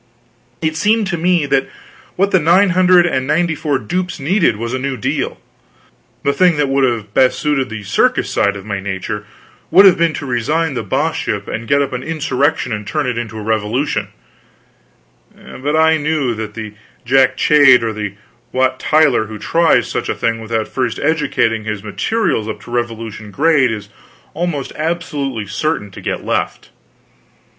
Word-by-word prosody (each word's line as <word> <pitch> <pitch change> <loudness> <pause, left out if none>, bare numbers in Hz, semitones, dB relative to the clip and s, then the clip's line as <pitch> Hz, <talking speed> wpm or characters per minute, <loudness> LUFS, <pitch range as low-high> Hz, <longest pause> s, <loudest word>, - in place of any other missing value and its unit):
It 155 0 0
seemed 210 +6 +2
to 175 - -1
me 175 -2 +2
that 135 -1 +1 0.5
what 200 +2 +1
the 185 - +4
nine 180 +5 +4
hundred 180 -1 +5
and 130 -6 -1
ninety 160 +2 +1
four 150 -3 -1
dupes 180 +6 -3
needed 165 - +2
was 115 +2 -4
a 130 - -1
new 135 0 -3
deal. 105 - -2 0.8
The 140 - +2
thing 175 +1 +3
that 145 -2 +1
would 135 0 +2
have 115 -5 -1
best 130 +1 +3
suited 140 -4 0
the 110 -2 -6
circus 100 - +1
side 100 0 +1
of 100 -1 -9
my 100 -2 -3
nature 100 +2 -5 0.4
would 195 +2 +7
have 185 -3 +6
been 170 -2 +2
to - - -5
resign 140 +6 0
the 125 - -2
Boss - - -1
ship - - -3
and 115 0 -5
get 140 +4 +3
up 135 - -5
an 125 - -3
insurrection 145 -3 -1
and 105 -1 -4
turn 150 -2 -1
it 125 -2 -1
into 110 -2 -6
a 110 - -6
revolution; 110 +7 -1 1.3
but 145 +4 -4
I 160 0 +4
knew 150 -4 0
that 110 -1 -6
the 110 -2 -6 0.3
Jack 130 +1 +3
Cade 145 -5 +6
or 115 -1 -1
the 105 -2 -5 0.4
Wat 130 0 +1
Tyler 150 -8 +3
who 110 0 -8
tries 165 +8 +2
such - - -3
a - - -1
thing 115 -1 -1
without 110 0 -2
first 125 -4 -2
educating 140 -8 0
his 105 -2 -4
materials 110 - -1
up 110 - -5
to - - -12
revolution 115 -3 -4
grade 145 +2 +3
is 105 -2 -6 0.4
almost 160 -4 -3
absolutely 150 -8 -3
certain 110 0 -2
to - - -10
get - - -4
left. - - -2
135 Hz, 180 wpm, -17 LUFS, 110-160 Hz, 1.3 s, would